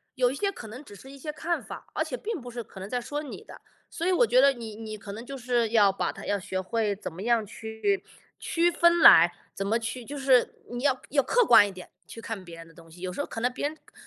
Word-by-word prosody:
有 250 -2 +3
一 - - -5
些 400 +7 0
可 240 - -10
能 245 +6 -9
只 205 - -13
是 265 - -13
一 275 - -11
些 300 +3 -5
看 335 +3 -2
法， - - -9
而 - - +1
且 - - -5
并 430 - -4
不 245 0 -9
是 240 0 -5
可 215 - -15
能 195 - -7
在 250 +1 -1
说 290 +5 -4
你 290 - -8
的， 445 - -13 0.3
所 335 - -4
以 370 - +3
我 340 -10 +4
觉 250 +3 +5
得 280 +1 +6
你 230 -5 -8
你 215 -1 -7
可 200 -1 -9
能 225 +3 -8
就 275 +1 -7
是 240 -2 0
要 205 -4 +4
把 - - -1
它 - - -10
要 205 - 0
学 190 -1 -4
会 210 +2 -1
怎 195 -4 -7
么 175 - -8
样 230 0 +2
去 220 - -2 0.3
区 340 +1 +1
分 340 0 +4
来， 175 - +9 0.2
怎 195 - -4
么 225 +4 +1
去 235 +2 -5
就 290 +5 -7
是 265 -2 +3 0.2
你 245 +1 -5
要 270 -3 +2
要 280 -1 +3
客 480 - +3
观 225 - +8
一 200 - -5
点， 185 -1 -11 0.2
去 - - -11
看 225 -4 -6
别 170 -1 -11
人 165 0 -11
的 165 - -18
东 165 0 -17
西。 175 - -15
有 180 0 -4
时 - - -3
候 - - -2
可 - - -6
能 245 +2 +1
别 285 - -1
人 305 - -7
的 - - -30
个 - - -23
235 Hz, 315 characters per minute, -27 LUFS, 205-280 Hz, 0.3 s, 来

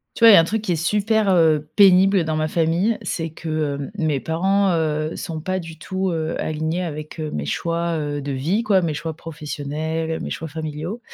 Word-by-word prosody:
Tu 230 - +2
vois, 230 - +11
il - - +9
y - - +10
a - - +9
un 165 - +3
truc 215 +4 -2
qui 185 -5 -1
est - - +1
super, 210 +4 +1
heu, 155 -4 +3
pénible 195 -2 +6
dans 160 0 -1
ma 155 0 0
famille, 170 +8 +1
c'est 165 -1 -3
que, 155 -2 -2
hem, 140 +4 -6
mes 155 -5 +1
parents, 190 +7 +1
heu, 155 -1 -1
sont 160 -2 -5
pas 185 +3 -2
du 165 -2 -10
tout, 190 +2 -2
heu, 160 -1 -2
alignés 160 +3 -2
avec, 155 -1 -6
heu, 155 -1 -3
mes 75 - -3
choix, 170 - -1
heu, 145 -1 -3
de 140 0 -4
vie, 165 - 0
quoi, 200 -6 +4
mes 160 -3 -1
choix 160 +2 -4
professionnels, 160 +1 -4
mes - - -5
choix 160 - -5
familiaux 160 +7 -5
160 Hz, 220 wpm, -22 LUFS, 155-185 Hz, -, vois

